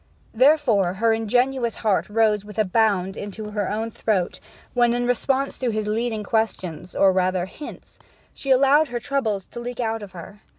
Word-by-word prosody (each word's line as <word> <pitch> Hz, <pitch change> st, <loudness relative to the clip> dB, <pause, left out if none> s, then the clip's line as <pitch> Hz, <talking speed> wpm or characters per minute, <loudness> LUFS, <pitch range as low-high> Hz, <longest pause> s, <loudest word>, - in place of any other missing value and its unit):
Therefore 235 Hz, -, +3 dB
her 225 Hz, +3 st, +2 dB
ingenuous 240 Hz, +2 st, +1 dB
heart 210 Hz, -2 st, 0 dB
rose 210 Hz, -1 st, +2 dB
with 210 Hz, -1 st, -12 dB
a 215 Hz, -, +3 dB
bound 195 Hz, -2 st, +1 dB
into 210 Hz, +1 st, -7 dB
her 210 Hz, +2 st, -2 dB
throat 200 Hz, -5 st, -1 dB, 0.3 s
when, 240 Hz, -1 st, +3 dB
in 245 Hz, 0 st, 0 dB
response 265 Hz, +3 st, 0 dB
to 255 Hz, -, 0 dB
his 215 Hz, -1 st, -2 dB
leading 220 Hz, 0 st, -1 dB
questions, 185 Hz, -6 st, -2 dB
or 195 Hz, -1 st, +4 dB
rather 185 Hz, -1 st, +1 dB
hints, 290 Hz, +10 st, -11 dB, 0.3 s
she 275 Hz, -, -7 dB
allowed 275 Hz, +4 st, +5 dB
her 240 Hz, -2 st, -4 dB
troubles 220 Hz, -7 st, -1 dB
to -, -, -9 dB
leak 245 Hz, 0 st, -6 dB
out 225 Hz, -2 st, -1 dB
of 200 Hz, -2 st, -10 dB
her. 185 Hz, +4 st, -10 dB
220 Hz, 170 wpm, -23 LUFS, 200-245 Hz, 0.3 s, allowed